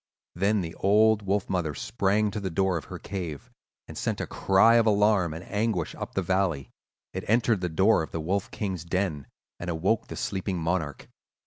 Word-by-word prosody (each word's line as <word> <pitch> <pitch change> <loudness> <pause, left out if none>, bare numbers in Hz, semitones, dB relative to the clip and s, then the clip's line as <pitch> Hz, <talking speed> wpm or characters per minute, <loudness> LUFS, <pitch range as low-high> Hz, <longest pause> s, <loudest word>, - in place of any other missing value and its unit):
Then 100 +3 +1
the 85 -1 -5
old 105 +2 +4
wolf 100 0 -1
mother 85 -6 -1
sprang 105 - 0
to 105 - -3
the 95 -2 -3
door 95 +1 +1
of 80 - -4
her - - -7
cave 90 -8 -6 0.4
and - - -9
sent - - -2
a - - -2
cry 105 +5 +4
of 115 -1 +3
alarm 105 -4 +3
and 80 +3 -7
anguish 105 -5 -1
up - - -7
the 95 - +1
valley. 90 -6 0 0.4
It - - -4
entered 115 -2 +2
the 90 - -1
door 95 +5 +3
of 80 - -5
the 80 - -4
Wolf 95 +5 -1
King's 95 -6 -4
den, 85 -5 -2 0.3
and 85 - -5
awoke 90 +7 0
the - - -7
sleeping 95 -1 -2
monarch. 80 -3 -2
95 Hz, 195 wpm, -27 LUFS, 85-105 Hz, 0.4 s, old